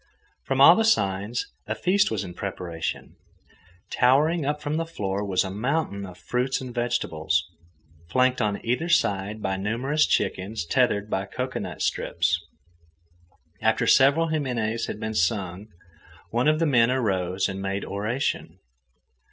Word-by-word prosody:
From 135 0 -1
all 160 +5 +9
the 225 - +2
signs, 100 - +1 0.2
a 110 - -2
feast 200 - +2
was - - -2
in 90 -2 -8
preparation. 85 -4 -5 0.7
Towering 145 +5 +3
up 150 +1 -1
from 150 +1 -2
the 165 - -1
floor 100 -10 -3
was 95 -3 +1
a 95 - -5
mountain 105 -2 -2
of 90 -1 -12
fruits 125 +8 -1
and 130 -2 -7
vegetables, 120 -8 -1 0.6
flanked 130 +4 +2
on 105 0 -1
either 125 +9 0
side 105 - +1
by 95 0 -1
numerous 125 +10 +1
chickens 95 0 -1
tethered 105 0 +1
by 95 -2 -2
cocoanut 125 +5 -4
strips. 85 +1 0 1.2
After - - +2
several 140 +5 +5
himines 120 -7 -1
had - - -5
been 110 0 -3
sung, 95 +1 -1 0.6
one 120 +4 +1
of 155 0 +4
the 165 - +1
men 120 -6 +4
arose 95 -7 0
and 95 0 -5
made 100 0 -3
oration. 105 +7 -2
110 Hz, 145 wpm, -25 LUFS, 95-135 Hz, 1.2 s, all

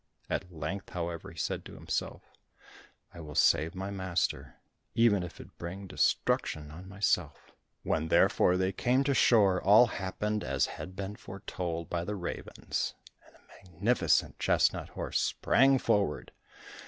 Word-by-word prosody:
At 90 - -2
length, 85 +4 -5
however, 85 -2 -4
he - - -14
said - - -2
to - - -10
himself, - - -4 0.9
"I 85 - -11
will 75 -3 -9
save 80 +4 +3
my 95 +2 -4
master, 95 -3 -2 0.4
even 115 -4 +4
if 90 -1 -8
it - - -14
bring 95 +3 -6
destruction 75 -4 0
on 90 +4 -10
myself." 100 +1 -1 0.3
When 80 0 0
therefore 90 +3 +4
they 95 +1 +1
came 125 +7 +1
to 140 0 +1
shore, 100 -8 +4
all 105 +5 +7
happened 105 0 -3
as - - +1
had 95 - -8
been 100 +2 -5
foretold 90 -4 -5
by 85 -1 -2
the 105 +4 -3
ravens, 90 -3 -4 0.3
and - - -22
a - - -25
magnificent 95 +6 0
chestnut - - +2
horse - - -2
sprang 135 +1 +3
forward. 100 - 0
95 Hz, 145 wpm, -30 LUFS, 85-105 Hz, 0.9 s, all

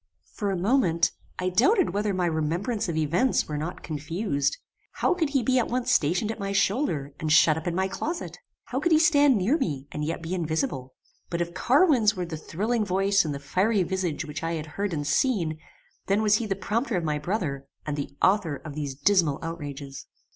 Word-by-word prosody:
For 205 -3 -2
a 190 - -1
moment 175 -5 +2 0.3
I 185 0 -1
doubted 310 - +3
whether 205 +1 0
my 185 -2 0
remembrance 170 +7 -1
of 160 - -2
events 170 - +1
were 150 - -4
not 155 +4 -5
confused. 150 -1 -2 0.4
How - - +1
could 330 -5 0
he 275 -3 +1
be 255 +2 +3
at 240 - 0
once 250 0 -1
stationed 180 +2 +2
at 225 - -7
my 200 0 -3
shoulder 175 - 0
and 155 -1 -2
shut 155 0 +6
up 160 +2 -5
in 170 - -1
my 190 +1 +1
closet? 310 - -4 0.2
How 255 - -3
could 345 +4 0
he 315 - +7
stand 290 -6 +5
near 230 - +2
me 145 - -2
and 150 - -4
yet 165 +2 -3
be 165 +3 -4
invisible? 160 - -2 0.3
But 170 - -2
if 170 0 -2
Carwin's 245 - +4
were 180 -1 -3
the 170 -2 -6
thrilling 215 +9 -1
voice 195 +1 +2
and 155 - -3
the 140 - -4
fiery 185 +8 +1
visage 175 -4 -2
which 150 0 -6
I 165 +1 -2
had 155 -2 -3
heard 195 +6 -3
and 145 -3 -2
seen, 160 - +1 0.5
then 200 +2 +2
was 210 -1 +4
he 230 - -3
the 195 - -1
prompter 220 +3 -1
of 175 - -2
my 150 -2 -1
brother, 150 -6 -3 0.2
and 150 - -2
the 145 -1 -4
author 185 -6 +3
of 150 +1 -9
these 140 -2 -4
dismal 160 -1 +2
outrages. 145 -4 -6
180 Hz, 210 wpm, -26 LUFS, 155-215 Hz, 0.5 s, he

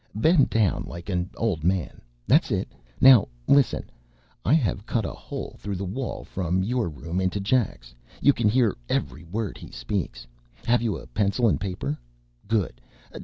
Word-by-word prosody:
Bend 150 +6 +4
down 110 -4 +1
like 85 +3 -8
an 90 -1 -1
old 95 -9 -1
man. 90 -3 0 0.2
That's - - +4
it! - - 0 0.3
Now, 130 -5 +8 0.2
listen: 140 -4 +3 0.6
I 145 - +4
have 110 -8 0
cut 115 -4 0
a - - -4
hole - - -7
through 100 -1 -4
the 95 +2 -3
wall 120 +7 -4
from 90 0 -1
your 120 -1 0
room 80 +4 -4
into 95 +2 0
Jack's. 95 - 0 0.3
You 140 - +5
can 115 -4 +2
hear 115 -2 +3
every 85 - -2
word 100 +4 -4
he - - -10
speaks. - - -4 0.4
Have 120 0 +3
you 115 -4 -1 0.2
pencil 105 +3 +2
and 105 - +1
paper? 90 -7 -3 0.5
Good! 100 - -1
100 Hz, 165 wpm, -25 LUFS, 90-115 Hz, 0.6 s, Now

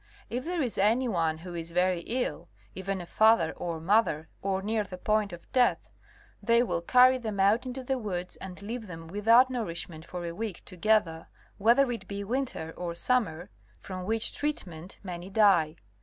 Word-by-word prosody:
If 250 +3 -3
there 345 -2 -1
is 240 -6 -3
any 230 +6 +3
one 165 -7 0
who 175 +2 -9
is 165 -1 -5
very 180 +1 +1
ill, 250 +2 -2 0.2
even 190 0 -3
a - - -7
father 215 -4 +4
or 170 -2 -4
mother, 165 -3 +2
or 190 -1 -1
near 215 +1 0
the 190 -2 -9
point 210 +1 +1
of 175 -1 -11
death, 250 -2 +2 0.5
they 235 0 +4
will 200 - -1
carry 255 +7 +5
them 215 -4 -4
out 210 +6 +3
into 255 +1 -5
the 265 +1 -1
woods 180 -5 -4
and 185 -1 -9
leave 225 +1 -5
them 165 -2 -8
without 230 +8 +5
nourishment 170 -8 -4
for 175 +1 -6
a 170 - -4
week 210 -1 -5
together 185 -3 +1 0.3
whether 240 +5 +4
it 225 -5 -6
be 200 0 -4
winter 225 -8 -3
or 175 -1 -4
summer, 180 -4 0 0.3
from 185 -1 -7
which 225 +2 -1
treatment 185 - -4
many 180 -1 -6
die. 195 -7 +4
200 Hz, 180 wpm, -29 LUFS, 175-230 Hz, 0.5 s, carry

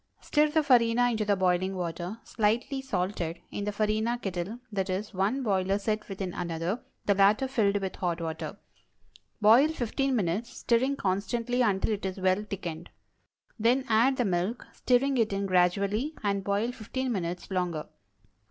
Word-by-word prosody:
Stir 300 0 +2
the 315 +1 +2
farina 245 -2 +4
into 220 -2 -1
the 205 -1 +3
boiling 185 0 +1
water 175 +3 -4
(slightly 235 +5 0
salted) 180 -9 -2
in 205 - -4
the 210 - -1
farina 215 +3 0
kettle 195 0 -4 0.2
(i. 195 - +2
e., 190 +1 -2
one 210 +8 0
boiler 195 -3 +1
set 215 +1 -2
within 190 -2 -4
another, 170 +6 -3 0.2
the 200 - +4
latter 205 +7 +4
filled 210 -6 +2
with 190 -2 -4
hot 175 -2 -1
water). 160 -1 -5 0.8
Boil 230 +8 +7
fifteen 270 -2 -1
minutes, 210 +3 -1
stirring 255 +4 +2
constantly 235 +3 -1
until 205 -2 +2
it 205 -2 -2
is 190 - -5
well 185 +2 +2
thickened. 170 -4 -5 0.7
Then 245 +4 +3
add 235 +5 +4
the 245 - +1
milk, 185 +5 -1
stirring 260 +2 +2
it 220 -2 +2
in 200 0 -1
gradually, 200 - +1
and 200 -1 0
boil 205 +5 0
fifteen 255 +2 -4
minutes 180 -3 -3
longer. 175 -4 -1
205 Hz, 160 wpm, -28 LUFS, 185-240 Hz, 0.8 s, Boil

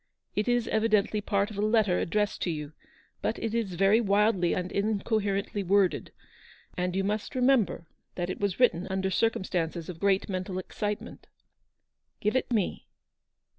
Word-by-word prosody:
It 210 - 0
is 245 -1 +2
evidently 215 -1 +2
part 200 0 0
of 205 - -6
a - - +1
letter 215 -4 +3
addressed 210 +3 -1
to - - 0
you; 150 -2 -4 0.5
but - - -1
it 225 -1 -3
is 220 -6 -1
very 195 +5 +4
wildly 200 -4 +2
and 180 0 -3
incoherently 205 -1 0
worded; 195 0 +2 0.6
and 180 0 -1
you 195 - +1
must 210 +5 -2
remem 255 -5 +4
ber 170 - -8 0.3
that 175 -1 -2
it - - -6
was 200 -1 -1
written 185 -8 +3
under 190 0 -1
circumstances 175 -5 -1
of 170 -3 -7
great 195 0 +2
mental 185 -1 -3
excitement." 205 +2 -5 0.5
" - - -53
Give 210 +4 0
it 260 - 0
me 215 -6 -1
200 Hz, 165 wpm, -28 LUFS, 185-215 Hz, 0.6 s, very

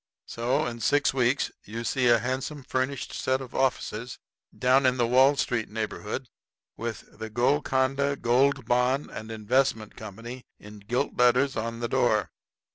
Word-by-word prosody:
So, 130 +6 0
in 120 -1 -5
six 145 +5 +2
weeks 130 +1 +1
you 115 +3 -6
see 125 +1 +1
a 120 0 +6
handsome 130 +5 -3
furnished 130 +1 -2
set 130 0 0
of 130 -2 -9
offices 125 -2 -1 0.4
down 130 +1 +4
in 130 0 +2
the 120 - +2
Wall 130 +4 +5
Street 120 -5 -1
neighborhood, 110 +3 -4 0.5
with 115 -1 -7
"The 110 0 -5
Golconda 135 +3 +1
Gold 135 +1 +2
Bond 125 +4 +1
and 110 - -7
Investment 110 0 0
Company" 115 +4 -8 0.2
in 105 0 -12
gilt 120 +7 -2
letters 125 +3 +3
on 115 +1 -3
the 120 - 0
door. 115 -5 +1
125 Hz, 150 wpm, -27 LUFS, 115-135 Hz, 0.5 s, a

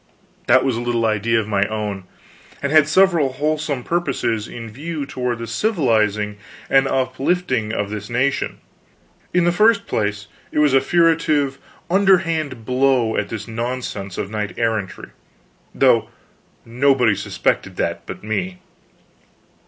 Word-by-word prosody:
_ - - -32
That 130 +2 +5
was 130 -3 +1
a 115 - -3
little 120 -1 0
idea 110 +1 +1
of 110 - -3
my 100 -2 +2
own, 105 -3 -4 0.5
and 140 - -2
had 155 -1 +6
several 165 -5 +3
wholesome 150 -2 -1
purposes 125 -10 -1
in 115 -1 -8
view 145 +6 -5
toward 125 -3 -3
the 115 - -5
civilizing 110 - 0 0.3
and 135 0 +5
uplifting 130 -2 0
of 105 -2 -2
this 105 -1 -6
nation. 130 +3 0 0.7
In 180 0 +2
the 175 - +3
first 210 +2 +3
place, 105 -1 -2 0.3
it - - -5
was 150 -2 +4
a 135 - +5
furtive, 155 -4 +2 0.3
underhand 165 - +2
blow 125 -2 +2
at - - -1
this 115 0 -6
nonsense 115 -4 -4
of 100 - -4
knight 105 -1 -4
errantry, 110 -4 -2 0.7
though - - +3 0.6
nobody 125 -1 +3
suspected - - -1
that - - -3
but - - -8
me. 95 -4 -3
125 Hz, 140 wpm, -20 LUFS, 110-150 Hz, 0.7 s, had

